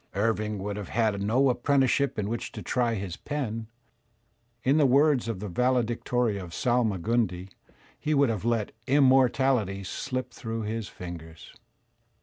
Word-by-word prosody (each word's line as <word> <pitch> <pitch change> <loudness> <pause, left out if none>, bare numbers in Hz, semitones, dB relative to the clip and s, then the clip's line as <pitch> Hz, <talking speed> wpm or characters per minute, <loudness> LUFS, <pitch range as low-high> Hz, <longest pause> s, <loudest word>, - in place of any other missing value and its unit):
Irving 105 0 0
would 100 +1 -4
have 100 -3 -6
had 110 -3 +1
no 120 +7 +3
apprenticeship 135 +1 +1
in 105 -2 -1
which 115 +2 -4
to - - -7
try 120 -2 0
his 95 -4 -5
pen; 115 -7 -4 1.0
in 135 +4 +3
the 150 - +5
words 140 -1 +3
of 115 -5 -3
the 105 - -5
valedictory 120 0 0
of 90 -2 -8
Salmagundi, 110 -5 0 0.5
he 155 0 0
would 140 -2 +4
have 110 -4 -2
let 115 -3 0 0.2
"immor 135 -2 +5
taUty 110 -8 0
slip 130 +4 -4
through 115 -2 -4
his 110 0 -3
fingers." 80 -3 -10
115 Hz, 145 wpm, -27 LUFS, 100-130 Hz, 1.0 s, the